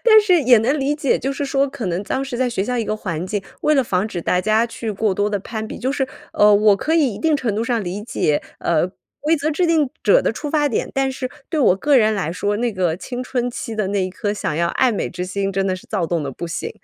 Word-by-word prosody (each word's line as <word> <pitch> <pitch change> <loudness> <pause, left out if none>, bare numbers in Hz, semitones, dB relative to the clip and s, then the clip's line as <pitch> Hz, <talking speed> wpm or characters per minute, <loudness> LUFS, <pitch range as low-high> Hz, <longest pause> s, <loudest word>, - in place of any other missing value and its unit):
但 435 -2 +8
是 365 -6 +3
也 245 -2 +6
能 260 +7 +1
理 280 +2 0
解， 295 -3 +1
就 270 - -2
是 280 +1 -3
说 275 0 +1
可 265 -5 -5
能 180 +1 -1
当 265 +6 -2
时 265 -3 -5
在 255 +1 +1
学 195 -5 -1
校 250 +3 -2
一 230 - 0
个 215 - -2
环 180 -5 -4
境， 205 +1 -2 0.2
为 305 - +3
了 270 - +4
防 190 -2 0
止 185 -5 -4
大 180 - +1
家 215 +4 +2
去 230 -1 -5
过 210 -1 0
多 205 +2 +1
地 205 - 0
攀 220 +2 -5
比。 - - -7
就 255 - -1
是， 270 -1 0 0.3
呃， 210 0 +5
我 205 0 +5
可 315 +10 -1
以 285 -9 +2
一 - - -8
定 320 -2 +2
程 245 -7 -2
度 220 - -1
上 235 -2 0
理 190 +3 -4
解， 150 -9 0 0.2
呃， 170 0 +1 0.3
规 315 +3 +2
则 300 +1 -1
制 345 +4 +1
定 315 -5 +2
者 - - +5
的 - - +1
出 295 - -5
发 295 -1 +2
点。 235 - -2
但 270 0 +1
是 260 -1 -4 0.2
对 320 - -2
我 190 -8 +4
个 285 +8 +3
人 220 -3 +4
来 180 -6 -2
说， 205 +3 -1
那 240 0 0
个 180 -4 0
青 245 +6 -5
春 245 -1 -2
期 230 -1 -5
的 215 -3 -1
那 200 -1 0
一 185 - -4
颗 205 +2 -2
想 205 -7 -3
要 170 +1 +1
爱 255 +8 +2
美 210 - -2
之 180 +1 -4
心， 195 +1 -2
真 195 0 0
的 185 - 0
是 215 +6 -14
躁 190 -6 -1
动 165 -1 -1
得 140 - -3
不 170 - -6
行。 165 - -4
220 Hz, 305 characters per minute, -20 LUFS, 195-270 Hz, 0.3 s, 但